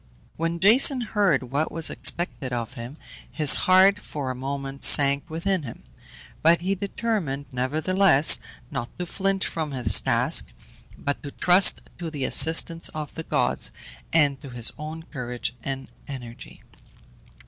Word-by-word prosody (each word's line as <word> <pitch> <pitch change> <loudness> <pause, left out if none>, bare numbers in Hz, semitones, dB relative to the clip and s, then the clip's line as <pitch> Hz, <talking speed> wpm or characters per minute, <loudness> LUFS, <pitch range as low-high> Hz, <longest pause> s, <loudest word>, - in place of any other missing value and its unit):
When 165 +1 -3
Jason 250 +7 +4
heard 200 - 0
what 145 +3 -2
was 165 -1 +1
expected 130 -7 -1
of 120 0 -5
him, 125 +3 -9 0.3
his 150 -3 +5 0.2
heart 190 +2 +5
for 145 -9 -6
a - - -7
moment 135 +1 -6
sank 140 +2 +4
within 175 +3 -2
him; 120 -6 -10 0.6
but 165 +1 +3
he 190 +3 -1
determined, 195 -8 -4
nevertheless, 155 +5 +3 0.3
not 120 - -5
to 180 - -4
flinch 195 +2 -2
from 155 -3 -5
his 115 -7 +4
task, - - +1 0.5
but 140 0 -4
to 145 - -8
trust 180 +6 +4 0.2
to 170 -2 -5
the 145 -4 -6
assistance 165 +1 +3
of 150 -2 -6
the 160 - -6
gods, - - -2 0.4
and 145 -4 +2
to 140 - -10
his 120 -2 -1
own 155 +2 -8
courage 125 -7 -6
and 135 -1 -6 0.2
energy. 125 -4 -10
155 Hz, 145 wpm, -24 LUFS, 135-180 Hz, 0.6 s, his